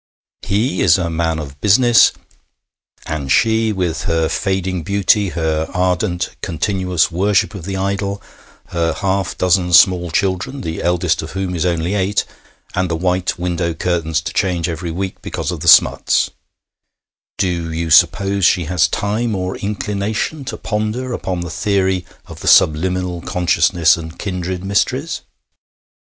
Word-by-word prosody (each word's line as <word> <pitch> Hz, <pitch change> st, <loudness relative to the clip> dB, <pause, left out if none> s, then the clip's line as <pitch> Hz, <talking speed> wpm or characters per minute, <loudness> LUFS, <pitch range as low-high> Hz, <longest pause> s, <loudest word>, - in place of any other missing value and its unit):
He 100 Hz, +1 st, -1 dB
is 85 Hz, -2 st, +5 dB
a 85 Hz, -3 st, -2 dB
man 80 Hz, 0 st, -1 dB
of 70 Hz, -2 st, -8 dB
business, 120 Hz, +4 st, +5 dB, 0.9 s
and 70 Hz, -4 st, -4 dB
she, 110 Hz, +3 st, +3 dB
with 90 Hz, -4 st, -2 dB
her 80 Hz, -1 st, +1 dB
fading 95 Hz, -2 st, -1 dB
beauty, 100 Hz, +2 st, +2 dB
her 80 Hz, -2 st, -2 dB
ardent, 90 Hz, 0 st, -1 dB
continuous 90 Hz, 0 st, 0 dB
worship 100 Hz, +5 st, +1 dB
of 95 Hz, -5 st, -8 dB
the 95 Hz, 0 st, -3 dB
idol, 100 Hz, +1 st, -2 dB, 0.5 s
her 85 Hz, -1 st, 0 dB
half 95 Hz, +2 st, -2 dB
dozen 90 Hz, -1 st, +2 dB
small 90 Hz, +1 st, +5 dB
children, 95 Hz, +10 st, -1 dB
the 80 Hz, -1 st, -4 dB
eldest 90 Hz, -1 st, +1 dB
of 80 Hz, -, -8 dB
whom 95 Hz, -1 st, -3 dB
is 85 Hz, +1 st, 0 dB
only 85 Hz, +1 st, -1 dB
eight, 100 Hz, 0 st, 0 dB, 0.5 s
and 90 Hz, -1 st, -1 dB
the 85 Hz, -, -1 dB
white 90 Hz, +1 st, -1 dB
window 85 Hz, -1 st, -2 dB
curtains 80 Hz, -3 st, -1 dB
to -, -, -6 dB
change 90 Hz, -4 st, 0 dB
every 85 Hz, 0 st, -4 dB
week 95 Hz, +3 st, -4 dB
because -, -, -4 dB
of -, -, -5 dB
the -, -, -5 dB
smuts -, -, +5 dB, 1.1 s
do 85 Hz, -3 st, -1 dB
you 80 Hz, 0 st, -3 dB
suppose 100 Hz, +5 st, +4 dB
she 85 Hz, +1 st, +4 dB
has 90 Hz, +1 st, +2 dB
time 110 Hz, +2 st, -1 dB
or 90 Hz, 0 st, -3 dB
inclination 105 Hz, +7 st, -3 dB
to 110 Hz, -, -5 dB
ponder 110 Hz, +5 st, -3 dB
upon 90 Hz, -6 st, -3 dB
the 85 Hz, 0 st, -5 dB
theory 95 Hz, +1 st, 0 dB, 0.2 s
of -, -, -11 dB
the -, -, -7 dB
subliminal 90 Hz, +2 st, +3 dB
consciousness 85 Hz, -1 st, +2 dB
and 80 Hz, 0 st, -8 dB
kindred 90 Hz, -2 st, -4 dB
mysteries? 125 Hz, +10 st, -1 dB
90 Hz, 150 wpm, -18 LUFS, 85-100 Hz, 1.1 s, is